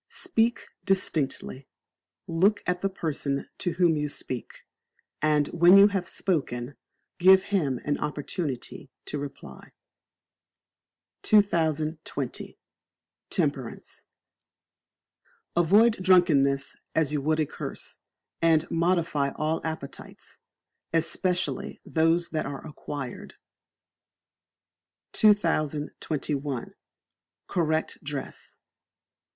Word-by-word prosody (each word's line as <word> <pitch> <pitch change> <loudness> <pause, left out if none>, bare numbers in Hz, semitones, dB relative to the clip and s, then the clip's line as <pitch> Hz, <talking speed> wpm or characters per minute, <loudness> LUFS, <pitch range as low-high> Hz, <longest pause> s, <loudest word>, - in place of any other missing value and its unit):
Speak 235 -10 0 0.2
Distinctly, 155 -8 -1 0.6
look 190 +6 +2
at 180 0 -1
the 195 - +1
person 145 -6 -3
to 175 - -1
whom 170 -2 +3
you 150 0 -1
speak, 130 -4 -7 0.6
and 150 -1 +3
when 175 +3 +6
you 200 +1 +8
have 195 -3 -2
spoken, 135 -8 -2 0.4
give 190 +1 +7
him 150 -11 0
an 145 - 0
opportunity 145 -2 -4 0.2
to 150 - -4
reply. 135 - -9 1.5
2020. 160 - 0 0.7
Temperance. - - -3 1.5
Avoid 200 +6 +4
Drunkenness 150 -7 +3 0.2
as 155 -2 +2
you 145 - 0
would 155 +2 +1
a 155 - +2
curse; - - -8 0.4
and 165 -1 +4
modify 170 -4 +1
all 155 +1 -1
appetites, 160 -4 -8 0.5
especially 170 +2 -1
those 165 +1 +2
that 155 - -2
are 140 -1 -7
acquired. 145 -4 -7 1.8
2021. 150 - 0 0.7
Correct 160 -2 -1
Dress. 140 -1 -6
160 Hz, 85 wpm, -27 LUFS, 145-180 Hz, 1.8 s, you